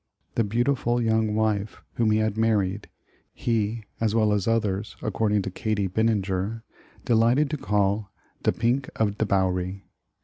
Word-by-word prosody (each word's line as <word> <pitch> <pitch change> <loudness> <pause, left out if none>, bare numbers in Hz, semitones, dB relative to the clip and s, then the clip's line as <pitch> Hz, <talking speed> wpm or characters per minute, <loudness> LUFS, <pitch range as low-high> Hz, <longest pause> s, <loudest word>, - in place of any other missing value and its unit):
The 115 - +2
beautiful 120 +2 +1
young 110 -2 +1
wife 110 -1 0
whom 115 -2 +1
he 110 - +3
had 110 -1 0
married, 105 -3 0 0.5
ho, 115 -1 0 0.2
as 110 -1 +1
well 110 -2 +3
as 100 -1 0
others 105 -2 0
according 105 -2 +1
to 95 - -4
Katie 105 0 -1
Bininger, 105 +1 0 0.4
delight 115 +1 +4
ed 150 -1 +1
to 150 - -1
call 100 -3 0 0.3
"de - - +2
pink 125 +3 0
of 105 -2 0
de 110 - +1
Bowery." 95 0 0
110 Hz, 150 wpm, -25 LUFS, 100-115 Hz, 0.5 s, delight